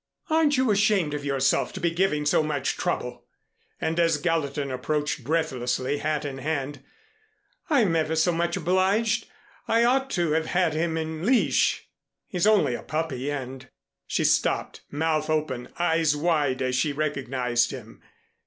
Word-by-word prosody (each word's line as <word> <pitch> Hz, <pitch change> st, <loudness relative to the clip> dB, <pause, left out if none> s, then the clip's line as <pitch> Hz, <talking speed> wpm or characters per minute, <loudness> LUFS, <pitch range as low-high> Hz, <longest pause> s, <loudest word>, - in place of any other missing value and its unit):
"Aren't 310 Hz, -3 st, +3 dB
you 260 Hz, -3 st, +2 dB
ashamed 200 Hz, -6 st, +2 dB
of 145 Hz, -1 st, -4 dB
yourself 135 Hz, -1 st, +1 dB
to -, -, -6 dB
be 170 Hz, -, +1 dB
giving 165 Hz, -4 st, 0 dB
so 150 Hz, -, +3 dB
much 150 Hz, -3 st, -1 dB
trouble!" -, -, -3 dB, 0.5 s
And 165 Hz, +1 st, -1 dB
as 165 Hz, -1 st, +3 dB
Gallatin 150 Hz, -5 st, -1 dB
approached, 145 Hz, +3 st, -2 dB
breathlessly, 135 Hz, -3 st, -1 dB
hat 155 Hz, -1 st, -1 dB
in 135 Hz, -2 st, -5 dB
hand, 140 Hz, -1 st, -3 dB, 0.9 s
"I'm 230 Hz, -, +3 dB
ever 160 Hz, 0 st, 0 dB
so 160 Hz, +3 st, +3 dB
much 170 Hz, +2 st, -1 dB
obliged. 190 Hz, +6 st, +1 dB, 0.4 s
I 230 Hz, +1 st, +3 dB
ought 265 Hz, +3 st, +2 dB
to 170 Hz, -3 st, +1 dB
have 160 Hz, +1 st, +1 dB
had 180 Hz, -3 st, +1 dB
him 160 Hz, +1 st, -1 dB
in 160 Hz, 0 st, -4 dB
leash. 245 Hz, +4 st, +2 dB, 0.4 s
He's 180 Hz, +2 st, 0 dB
only 210 Hz, -, +4 dB
a -, -, -4 dB
puppy 145 Hz, -4 st, -3 dB
and 135 Hz, -2 st, -6 dB, 0.2 s
" -, -, -61 dB
She -, -, 0 dB
stopped, -, -, +1 dB
mouth 155 Hz, +1 st, -1 dB
open, 150 Hz, -6 st, -1 dB
eyes 165 Hz, -3 st, +2 dB
wide 145 Hz, -5 st, +1 dB
as 130 Hz, 0 st, -1 dB
she 145 Hz, +3 st, +1 dB
recognized 130 Hz, -5 st, 0 dB
him. 115 Hz, -4 st, -10 dB
155 Hz, 155 wpm, -25 LUFS, 140-175 Hz, 0.9 s, only